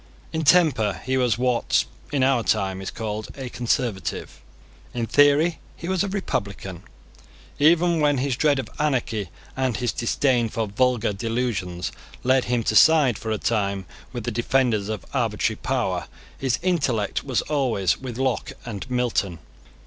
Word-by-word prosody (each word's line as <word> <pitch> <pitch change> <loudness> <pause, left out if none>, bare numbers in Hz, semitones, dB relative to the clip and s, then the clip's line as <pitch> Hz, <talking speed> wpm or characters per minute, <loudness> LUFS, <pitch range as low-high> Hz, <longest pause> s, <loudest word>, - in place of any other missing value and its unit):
In 160 0 -1
temper 135 - +4
he 130 +1 0
was 125 -3 +2
what, 125 -1 +2 0.3
in 140 -3 +1
our 130 -2 +3
time, 95 -4 0
is 95 - -4
called 110 -1 -4
a 130 -2 -5
Conservative: 120 - -2 0.5
in 120 -1 0
theory 145 +6 +4 0.2
he 170 - -7
was 190 +1 +1
a - - -1
Republican. 100 - -3 0.8
Even 170 +2 +4
when 145 -2 +3
his 130 0 0
dread 145 +1 +3
of 135 - -3
anarchy 120 -9 0 0.3
and 130 -3 0
his 120 -1 0
disdain 120 -1 +1
for 115 0 -2
vulgar 120 0 +1
delusions 100 -5 -2 0.3
led 130 0 +3
him 120 -1 0
to 110 - 0
side 145 -5 +6
for 110 - -5
a 110 - 0
time 100 -4 -1 0.3
with 120 -3 -5
the - - -2
defenders 120 -3 +1
of 110 -4 -4
arbitrary - - 0
power, - - -1 0.3
his 130 -2 0
intellect 140 - 0
was 130 -3 0
always 125 - 0
with 125 -3 -6
Locke 130 -3 -1
and 115 0 -6
Milton. 120 -8 0
125 Hz, 155 wpm, -24 LUFS, 110-135 Hz, 0.8 s, side